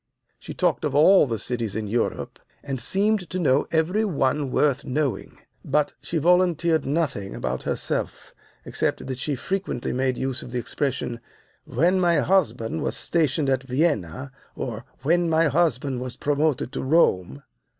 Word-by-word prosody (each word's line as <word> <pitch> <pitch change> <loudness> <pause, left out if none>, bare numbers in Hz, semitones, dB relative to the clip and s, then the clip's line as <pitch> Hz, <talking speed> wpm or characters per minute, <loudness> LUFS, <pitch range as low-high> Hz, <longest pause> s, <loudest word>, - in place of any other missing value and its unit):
She - - -9
talked - - +1
of 145 -2 -1
all 160 +2 +6
the 115 -2 -2
cities 115 -2 -3
in 110 -1 -2
Europe, 115 +3 -2 0.2
and 135 -3 -4
seemed 200 - +1
to 185 - -3
know 145 -5 +2
every 170 +7 +1
one 145 -7 0
worth 140 +1 +1
knowing. 140 0 -2 0.3
But 150 -1 +1
she 165 - -2
volunteered 170 -1 +2
nothing 140 -10 -1
about - - -3
herself - - -3 0.3
except - - -1
that 130 -1 -5
she 145 +1 -1
frequently 190 -2 -3
made 130 0 0
use 130 -1 -2
of - - -9
the 125 - -4
expression, 125 -1 -2 0.5
'When 175 +8 +2
my 175 -2 +3
husband 140 - +1
was - - -1
stationed 155 -3 +1
at 130 -1 +1
Vienna,' 130 - -1 0.2
or 120 -2 -5 0.2
'When 170 +3 +2
my 160 0 +3
husband 140 -5 0
was 125 -1 -5
promoted 145 -3 0
to - - -4
Rome. 140 - +2
145 Hz, 155 wpm, -24 LUFS, 125-170 Hz, 0.5 s, all